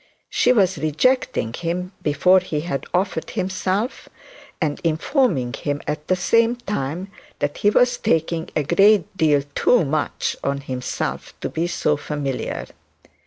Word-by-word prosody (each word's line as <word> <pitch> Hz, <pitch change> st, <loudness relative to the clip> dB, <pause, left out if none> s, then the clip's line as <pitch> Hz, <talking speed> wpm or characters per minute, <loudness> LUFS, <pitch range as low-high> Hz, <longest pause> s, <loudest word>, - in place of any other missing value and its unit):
She 245 Hz, -, +3 dB
was 190 Hz, -, +3 dB
rejecting 155 Hz, -, +1 dB
him 180 Hz, +5 st, -3 dB
before 180 Hz, +6 st, +4 dB
he 155 Hz, -5 st, -3 dB
had 140 Hz, -5 st, -4 dB
offered 180 Hz, -3 st, -1 dB
himself, 190 Hz, +5 st, -2 dB, 0.5 s
and 155 Hz, -4 st, -1 dB
informed 160 Hz, -, +1 dB
him 145 Hz, -1 st, -2 dB
at 150 Hz, 0 st, -4 dB
the 185 Hz, -, +3 dB
same 230 Hz, +6 st, +3 dB
time 190 Hz, -, -4 dB, 0.3 s
that 145 Hz, 0 st, -2 dB
he 205 Hz, -, +3 dB
was 245 Hz, +3 st, +3 dB
taking 160 Hz, 0 st, 0 dB
a 155 Hz, -, +2 dB
great 195 Hz, +5 st, +4 dB
deal 150 Hz, -5 st, +3 dB
too 240 Hz, +2 st, +3 dB
much 150 Hz, +1 st, -1 dB
on 140 Hz, 0 st, -1 dB
himself 130 Hz, -2 st, -4 dB
to -, -, -2 dB
be 165 Hz, +2 st, -1 dB
so 155 Hz, -4 st, 0 dB
familiar. 145 Hz, -3 st, -3 dB
165 Hz, 140 wpm, -22 LUFS, 145-195 Hz, 0.5 s, before